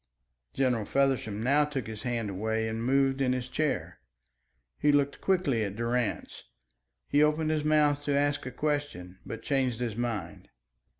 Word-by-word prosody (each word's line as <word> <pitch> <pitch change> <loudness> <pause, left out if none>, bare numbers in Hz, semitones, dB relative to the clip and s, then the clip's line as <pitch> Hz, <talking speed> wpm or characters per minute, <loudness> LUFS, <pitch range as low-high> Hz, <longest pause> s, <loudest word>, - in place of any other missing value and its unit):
General 125 -5 +1
Feversham 130 -6 0
now 140 +4 +4
took 145 -4 -3
his 110 -1 -7
hand 115 -4 -2
away 110 +3 -1
and 110 +1 -3
moved 135 +1 +2
in 130 -1 +2
his 125 -1 -3
chair. 150 +3 -2 0.8
He 150 - +4
looked 140 -1 +1
quickly 160 - +1
at 100 -1 -4
Durrance; 120 0 -2 0.6
he 145 - +3
opened 155 +1 +2
his 155 -1 0
mouth 150 -1 +3
to 145 -1 +1
ask 145 -1 0
a - - -4
question, 145 -11 -3
but 115 - -6
changed 130 -4 0
his 120 -4 -2
mind. 110 -8 -4
130 Hz, 160 wpm, -29 LUFS, 115-145 Hz, 0.8 s, now